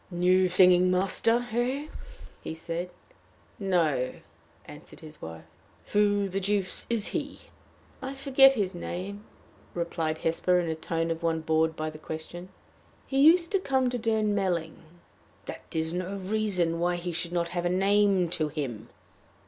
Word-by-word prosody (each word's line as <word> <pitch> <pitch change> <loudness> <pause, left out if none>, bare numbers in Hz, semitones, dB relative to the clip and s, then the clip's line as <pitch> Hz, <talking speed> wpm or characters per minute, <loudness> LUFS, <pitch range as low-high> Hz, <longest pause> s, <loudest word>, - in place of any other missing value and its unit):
"New 185 +1 +3
singing 180 0 +5
master, 195 +6 +1
eh?" 250 +5 -1 0.6
he 160 - -6
said. 170 +2 -4 0.7
"No," 160 -10 +1 0.5
answered 75 0 -13
his 155 -1 -13
wife. 80 0 -8 0.5
"Who 205 -1 +3
the 195 +1 -2
deuce 195 -1 -2
is 230 -3 -1
he?" - - -4 0.6
"I 265 +1 -5
forget 270 0 +5
his 200 -5 -1
name," 190 +4 -6 0.5
replied 165 -2 -2
Hesper, 180 +3 +1
in 175 - -1
the 160 - 0
tone 165 +1 -2
of 165 0 -3
one 165 -1 0
bored 160 0 +1
by 155 0 -3
question. 160 +3 -8 0.6
"He 270 - -1
used 335 +4 +6
to 390 - +2
come 265 -7 +1
to 245 - -2
Durnmelling." 205 -7 0 0.7
"That - - -8
is 160 +1 -1
no 185 +2 -3
reason 190 -4 -1
why 175 +1 +1
he 175 0 -4
should 170 +1 -3
not 170 -1 -1
have 175 0 -1
a - - 0
name 195 0 +3
to 165 -3 0
him." 130 -7 -5
180 Hz, 150 wpm, -28 LUFS, 165-205 Hz, 0.7 s, used